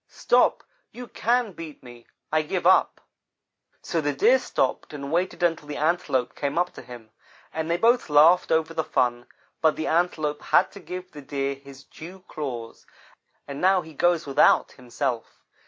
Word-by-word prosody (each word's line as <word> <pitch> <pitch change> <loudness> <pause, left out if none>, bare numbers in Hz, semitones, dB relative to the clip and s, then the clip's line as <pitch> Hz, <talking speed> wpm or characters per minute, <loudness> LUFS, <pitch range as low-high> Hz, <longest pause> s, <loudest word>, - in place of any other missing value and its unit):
Stop, - - +2 0.3
you 250 +1 -9
can 240 -1 0
beat 165 -6 -10
me. 120 -2 -14 0.2
I 155 0 +2
give 170 +3 -4
up.' 185 - +3 0.8
"So - - -1
the - - -1
Deer - - +4
stopped - - -2
and 140 -1 -6
waited 175 +1 -1
until 165 -3 0
the 150 - -5
Antelope 150 -5 0
came 140 +2 -3
up 180 +1 0
to - - -10
him, 120 -3 -12 0.4
and 160 0 -3
they 170 - +1
both 235 0 +2
laughed 155 +5 +5
over 160 0 +1
the 160 -1 -1
fun, 120 -3 -1 0.3
but 160 -1 +3
the 155 - -4
Antelope 155 -3 0
had 180 - +2
to 200 - -11
give 180 0 -8
the 150 - -10
Deer 140 0 -3
his 135 0 -14
dew 180 +6 -12
claws, 120 -7 -7 0.6
and 140 0 -7
now 190 0 +4
he 160 0 -13
goes 170 +2 +1
without 140 -1 +3
himself. 120 -1 -5
155 Hz, 170 wpm, -25 LUFS, 140-180 Hz, 0.8 s, laughed